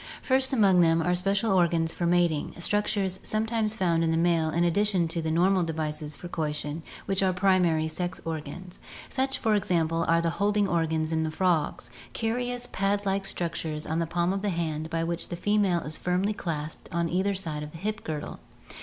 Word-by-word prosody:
First 260 +1 +2
among 200 -8 +5
them 165 -1 +4
are 180 - +2
special 195 +4 +1
organs 170 -3 +2
for 175 - -1
mating, 170 -3 +1
structures 195 0 0
some 215 +1 -1
times 220 -1 0
found 170 -5 +1
in 165 - +1
the 165 - +1
male 165 -1 +2
in 170 +2 +1
addition 185 0 +2
to 165 +1 -1
the 160 - -2
normal 180 +4 +3
devices 155 -2 -3
for 175 - -8
coition, 150 -2 -3 0.2
which 195 -1 +1
are 190 -1 +3
primary 180 -4 +3
sex 175 +3 -4
organs. 165 +3 -6 0.3
Such, 265 0 0
for 220 -2 +1
example, 165 -4 +1
are 165 0 +4
the 170 0 0
holding 205 0 +3
organs 160 -2 0
in 160 0 +1
the 160 - 0
frogs, 155 -7 0 0.2
curious 245 +2 -1
pad 200 +1 0
like 195 0 0
structures 160 -4 -3
on 160 +1 -1
the 165 - 0
palm 175 +2 0
of 195 - -2
the 205 - 0
hand, 160 -3 -2
by 165 0 -1
which 170 0 -3
the - - -4
female 200 -2 +2
is 155 +1 -6
firmly 185 +4 0
clasped 155 -5 -5
on 170 -1 0
either 190 +4 0
side 160 -6 -3
of 150 0 -7
the 165 - -10
hip 210 +5 -3
girdle. 155 -2 -5
175 Hz, 200 wpm, -27 LUFS, 160-195 Hz, 0.3 s, among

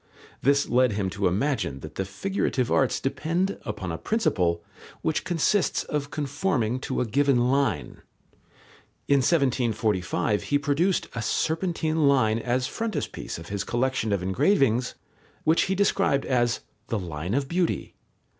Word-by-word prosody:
This 140 +1 +3
led 125 -2 +3
him 100 -2 -1
to 100 0 0
imagine 95 - -1
that - - -9
the 95 - -3
figurative 130 - -1
arts 135 -2 +2
depend 170 +8 -1
upon 100 -6 -4
a 80 - -4
principle 90 - 0 0.4
which 160 - 0
consists 180 0 +1
of 145 -1 -3
conforming 140 - -1
to 130 -1 -2
a - - +1
given 125 +1 +2
line. 140 0 0 1.1
In 140 - +4
1745 115 - +1
he 145 - +1
produced 150 +6 +1
a 115 - -3
serpentine 160 - 0
line 115 -5 +3
as 125 +2 0
frontispiece 225 +9 -4
of 85 - -10
his 100 -1 -2
collection 120 -2 0
of 100 -3 0
engravings, 125 - +2 0.5
which 160 +2 +3
he 190 - 0
described 195 -8 +2
as 120 -2 +1 0.3
"the 115 - -1
line 90 +1 -3
of 140 0 0
beauty." 175 +3 -1
130 Hz, 140 wpm, -26 LUFS, 110-155 Hz, 1.1 s, In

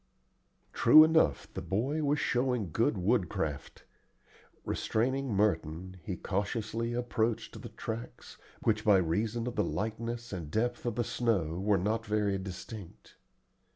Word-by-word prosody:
True 155 +7 +8
enough, 155 - +3
the - - -4
boy 135 +11 -1
was 145 +1 +2
showing 125 -7 0
good 110 +3 +1
woodcraft. 90 - -1 0.8
Restraining 130 +3 -1
Merton, 95 -3 0
he 90 +2 -4
cautiously 110 +3 -2
approached 120 -2 -1
the - - -8
tracks, 115 +1 -7 0.2
which 110 -1 +1
by 105 -4 +6
reason 105 +7 0
of 125 - -4
the 105 - +2
lightness 115 +1 -3
and 85 -5 -5
depth 120 +6 -1
of 120 - -1
the 120 - +1
snow 95 -9 0
were 100 +1 +2
not 110 +5 0
very 105 -3 0
distinct. 95 0 -9
110 Hz, 130 wpm, -31 LUFS, 95-120 Hz, 0.8 s, True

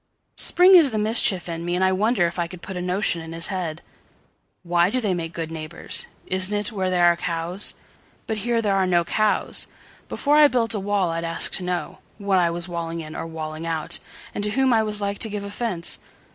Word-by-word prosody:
Spring 365 +2 +6
is 335 -6 +8
the 220 - -3
mischief 210 -4 +2
in 165 -1 -4
me, 175 +1 -1
and 185 - +1
I 190 - +4
wonderIf 190 -3 +1
I 170 - 0
could 175 0 -11
put 190 - -6
a 180 - -3
notion 180 -1 0
in 160 0 -8
his 165 +1 -4
head:"Why 175 0 -4
do 255 - 0
they 210 -6 0
make 165 -2 -3
good 165 -1 -5
neighbours? 160 +1 -6 0.2
Isn't 190 +2 +1
itWhere 200 -3 -1
there 180 -1 +3
are 170 0 +5
cows? 170 +3 -1 0.5
But 220 -3 -2
here 230 +2 0
there 200 -2 +2
are 190 -1 +2
no 175 -1 +3
cows. 215 +5 +1 0.4
Before 295 +1 +2
I 300 -1 +8
built 240 -5 +1
a 210 - 0
wall 195 -3 0
I'd 165 0 -3
ask 165 0 0
to 185 - -1
knowWhat 185 +2 -2
I 175 -1 +3
was 170 +1 -4
walling 170 -1 -4
in 155 -1 -9
or - - -4
walling 160 0 -6
out, 165 +1 -2 0.3
And 205 - -3
to 210 - +1
whom 260 +3 +2
I 225 - +4
was 210 -1 -2
like 200 0 -2
to 220 - +1
give 205 -1 -4
offence. 200 -4 -1
185 Hz, 215 wpm, -23 LUFS, 170-210 Hz, 0.5 s, is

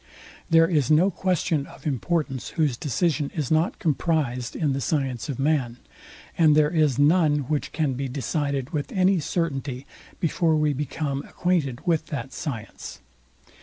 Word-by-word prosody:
There 165 0 +6
is 155 -6 +1
no 165 +6 +4
question 170 -6 0
of - - -15
importance, 140 -2 -1
whose 150 -6 +2
decision 145 - 0
is 150 -5 -2
not 160 +2 +2
comprised 145 -6 -1
in 150 -4 0
the 135 - -2
science 135 -2 -1
of 135 - -3
man; 135 -4 0 0.6
and 155 -3 +5
there 150 0 +4
is 155 -7 +2
none, 150 0 +4
which 150 -1 -2
can 150 -4 0
be 135 +2 -3
decided 140 +1 -2
with 150 -4 -3
any 185 -1 +3
certainty, 140 -5 -2 0.3
before 165 -1 +1
we 150 -1 +2
become 140 0 -3
acquainted 155 -8 -1
with 165 -2 +1
that 135 -3 -5
science. 125 -8 -6
150 Hz, 150 wpm, -25 LUFS, 135-165 Hz, 0.6 s, There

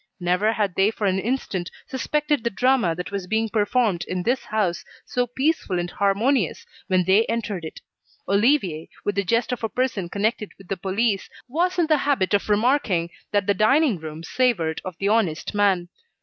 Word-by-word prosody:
Never 180 +5 +1
had 205 -4 0
they 195 +3 +3
for 220 -1 -3
an 190 -1 +2
instant 195 -6 -2 0.2
suspected 295 0 -1
the 235 - +1
drama 240 -6 +2
that 180 +3 -6
was 195 -2 -4
being 220 +2 0
performed 210 -4 +1
in 180 -1 -2
this 250 +5 0
house, 205 -5 -1 0.2
so 245 0 -1
peaceful 260 - 0
and 175 0 -2
harmonious 200 - +1 0.2
when 185 -2 +2
they 190 +5 +4
entered 215 -6 -2
it. 160 - -8 0.5
Olivier, 200 - +2 0.2
with 205 - +1
the 200 +1 0
jest 230 +6 +1
of 245 -2 -3
a 225 - 0
person 230 -8 -1
connected 210 +2 -1
with 195 -2 -16
the 195 - 0
police, 195 +3 -1 0.2
was 350 +8 0
in 345 - +3
the 310 -2 +3
habit 265 -10 +1
of 205 +1 +1
remarking 210 -6 +2 0.2
that 205 -2 +1
the 200 - +3
dining 235 - +3
room 155 0 -8
savoured 170 -7 0
of 185 -3 -7
the 195 - -1
honest 205 -7 +1
man. 195 -4 +2
205 Hz, 185 wpm, -23 LUFS, 185-245 Hz, 0.5 s, they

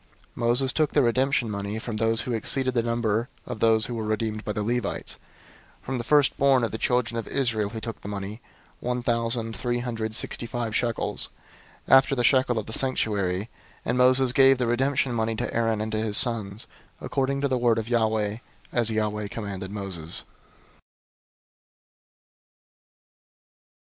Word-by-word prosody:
003:049 - - -22
Moses 125 +2 +2
took 155 -2 +1
the 145 - +4
redemption 130 +1 +2
money 100 +1 -3
from 110 0 -5
those 115 +1 +2
who 125 - -3
exceeded 130 +3 +1
the 120 - +2
number 115 0 0 0.2
of 125 -3 -6
those 110 -1 +4
who 120 - -5
were 115 -2 -3
redeemed 110 0 -2
by - - -3
the 105 0 -2
Levites; 120 -1 -2 0.6
003:050 - - -25
from 130 0 -2
the - - -3
firstborn 140 -2 +3
of 115 - 0
the 110 - -4
children 120 -2 +1
of 115 - -6
Israel 115 -6 0
he 110 +1 -6
took 115 -1 -6
the - - -8
money, 100 +2 -5 0.4
one 125 0 -2
thousand 115 -1 0
three 120 +3 -1
hundred 115 -3 -3
sixty 120 - -2
five 115 -2 -3
shekels, 115 -2 -1 0.6
after 135 +1 +5
the 120 - 0
shekel 130 -1 +3
of 110 - -2
the 110 - -8
sanctuary: 100 -8 0
003:051 105 - -8 0.4
and 120 - 0
Moses 130 0 +5
gave 135 0 +6
the 125 - 0
redemption 130 +2 +1
money 110 -1 0
to - - -3
Aaron 115 -2 +1
and 110 0 -3
to 110 - -1
his 110 -2 +3
sons, 110 -5 +2 0.3
according 140 0 -1
to 140 - +2
the 130 -2 0
word 120 -2 +3
of 110 -1 -2
Yahweh, 110 -3 +1 0.4
as 120 -2 +2
Yahweh 105 -1 -1
commanded 100 -3 -5
Moses. 95 -5 -4
115 Hz, 175 wpm, -26 LUFS, 110-125 Hz, 0.6 s, gave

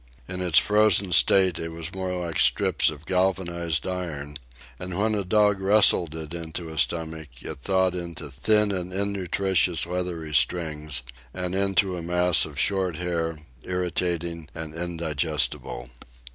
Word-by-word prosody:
In 90 0 -5
its 85 -4 +2
frozen 105 -2 +4
state 90 +4 +4
it 80 0 -5
was 80 +1 -6
more 95 -1 -3
like 85 -2 -3
strips - - +3
of 75 0 -9
galvanized 85 -3 -1
iron, 75 -6 -5 0.4
and 90 -1 -5
when 110 +2 +1
a 105 -2 -1
dog 105 +1 +2
wrestled 95 -5 +5
it 80 -1 -6
into 85 0 -6
his 80 -1 0
stomach 80 +2 -3 0.2
it - - -7
thawed 95 +2 +1
into 85 -4 -6
thin 105 +9 +2
and 90 -1 -3
innutritious 95 -3 +1
leathery 85 -3 -4
strings 75 -4 0 0.3
and 90 -1 -3
into 95 -1 +1
a - - -5
mass 90 +1 +3
of 75 -3 -11
short 95 0 +1
hair, 85 -1 -2 0.3
irritating 85 -2 -2
and 80 -1 -6
indigestible. 80 -7 -2
85 Hz, 145 wpm, -25 LUFS, 80-95 Hz, 0.4 s, wrestled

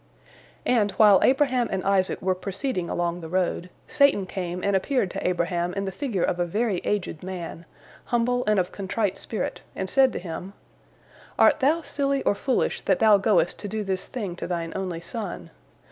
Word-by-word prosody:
" - - -25 0.2
And 220 -5 +3
while 205 -3 +6
Abraham 260 -3 +3
and 190 -1 -2
Isaac 195 -2 +1
were 185 0 +2
proceeding 185 +1 -3
along 175 0 -1
the 160 - -7
road, 180 0 -1 0.2
Satan 280 -9 +3
came 180 -1 -4
and 200 -1 +2
appeared 195 -1 0
to - - -3
Abraham 175 0 -1
in 195 0 -2
the 190 - -3
figure 215 - -2
of 180 - 0
a 175 - +2
very 210 +2 0
aged 180 -5 -2
man, 175 -2 -6 0.4
humble 245 +1 +1
and 215 -1 +3
of 180 - -1
contrite 200 0 -2
spirit, 220 - -4
and 190 - -3
said 265 +6 +4
to - - -3
him: 180 +2 -6 0.8
"Art - - +5
thou 310 +5 +2
silly 275 -2 -1
or - - +3
foolish, 250 +5 0
that 190 - +2
thou 215 -2 +6
goest 195 -3 +2
to 205 - -5
do 215 +1 -3
this 190 -2 -2
thing 205 -8 -5
to - - -5
thine 170 -2 -3
only 185 -3 -3
son? 190 - -5
195 Hz, 190 wpm, -25 LUFS, 180-230 Hz, 0.8 s, while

